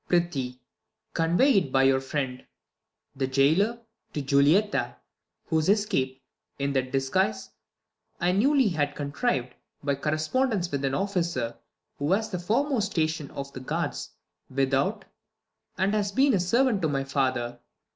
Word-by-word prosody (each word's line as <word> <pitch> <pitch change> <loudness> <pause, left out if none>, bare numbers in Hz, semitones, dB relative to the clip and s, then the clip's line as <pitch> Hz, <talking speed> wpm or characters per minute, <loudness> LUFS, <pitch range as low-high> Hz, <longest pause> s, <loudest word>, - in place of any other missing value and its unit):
Prithee, 140 -8 0 0.5
convey 175 - +4
it 140 -8 -5
by 135 0 +4
your 135 0 +4
friend, 135 -2 -3 0.7
The 135 -1 -1
Jailor, 160 - +2 0.3
to 150 - -2
Julietta, 145 +10 +3 0.5
whose 160 +1 +1
escape. 185 -12 +1 0.3
In 140 0 -1
that 130 -1 -1
disguise, 135 -4 0 0.7
I 175 +1 +2
newly 260 +5 +3
have 145 -4 -1
contriv'd, 140 - -1 0.3
By 140 0 +1
correspondence 170 - 0
with 140 -1 -2
an 135 0 0
officer 170 -11 -1 0.4
Who 145 +4 0
has 220 +3 0
the 180 - -2
foremost 230 +3 0
station 155 -3 -1
of 140 0 -7
The - - -6
guards 130 - -3 0.4
without, 135 +1 0 0.7
and 195 +2 +1
has 205 -2 0
been 265 -1 +3
servant 230 +4 +2
to 160 - +2
My 140 -2 -1
father. 130 -3 -1
155 Hz, 135 wpm, -27 LUFS, 135-200 Hz, 0.7 s, convey